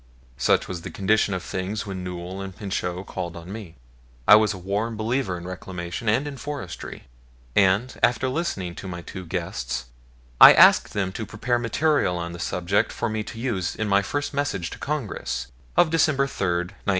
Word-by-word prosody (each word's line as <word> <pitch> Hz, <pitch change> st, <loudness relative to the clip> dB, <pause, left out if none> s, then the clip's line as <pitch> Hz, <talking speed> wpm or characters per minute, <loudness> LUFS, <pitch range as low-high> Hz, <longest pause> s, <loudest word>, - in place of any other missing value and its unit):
Such -, -, +2 dB
was 90 Hz, -2 st, -5 dB
the -, -, -6 dB
condition 100 Hz, +1 st, +2 dB
of 90 Hz, -, -4 dB
things 100 Hz, +4 st, -3 dB
when 95 Hz, -2 st, -5 dB
Newell 90 Hz, +1 st, -6 dB
and 95 Hz, -2 st, -7 dB
Pinchot 95 Hz, -2 st, -3 dB
called 90 Hz, -3 st, -5 dB
on 85 Hz, +2 st, -9 dB
me. 105 Hz, -7 st, -8 dB, 0.5 s
I -, -, +10 dB
was 110 Hz, 0 st, +4 dB
a 95 Hz, -, -5 dB
warm 105 Hz, +5 st, -2 dB
believer 110 Hz, -3 st, -1 dB
in 85 Hz, -, -9 dB
reclamation 90 Hz, +3 st, -4 dB
and 120 Hz, +7 st, +2 dB
in 145 Hz, -2 st, -6 dB
forestry, 130 Hz, -10 st, -6 dB, 0.5 s
and, 100 Hz, +6 st, +3 dB
after 125 Hz, +2 st, +3 dB
listening 130 Hz, -, -2 dB
to 95 Hz, -, -7 dB
my 85 Hz, -2 st, -6 dB
two 95 Hz, 0 st, -8 dB
guests, 65 Hz, -9 st, -3 dB, 0.6 s
I -, -, +13 dB
asked -, -, +6 dB
them 95 Hz, -2 st, -1 dB
to 110 Hz, +3 st, -5 dB
prepare 120 Hz, -1 st, -1 dB
material 120 Hz, -, +1 dB
on 85 Hz, 0 st, -4 dB
the 85 Hz, -, -8 dB
subject 90 Hz, +4 st, 0 dB
for 120 Hz, -, -2 dB
me 110 Hz, 0 st, -2 dB
to 115 Hz, -, -8 dB
use 110 Hz, -8 st, -1 dB
in 110 Hz, -, -2 dB
my 100 Hz, 0 st, +4 dB
first 145 Hz, +9 st, -3 dB
message 140 Hz, -12 st, -1 dB
to -, -, -8 dB
Congress, 140 Hz, -, -3 dB, 0.3 s
of 160 Hz, -, +5 dB
December 155 Hz, -4 st, +3 dB
3, 120 Hz, -8 st, -2 dB
1901. 85 Hz, 0 st, -1 dB
100 Hz, 185 wpm, -24 LUFS, 90-120 Hz, 0.6 s, I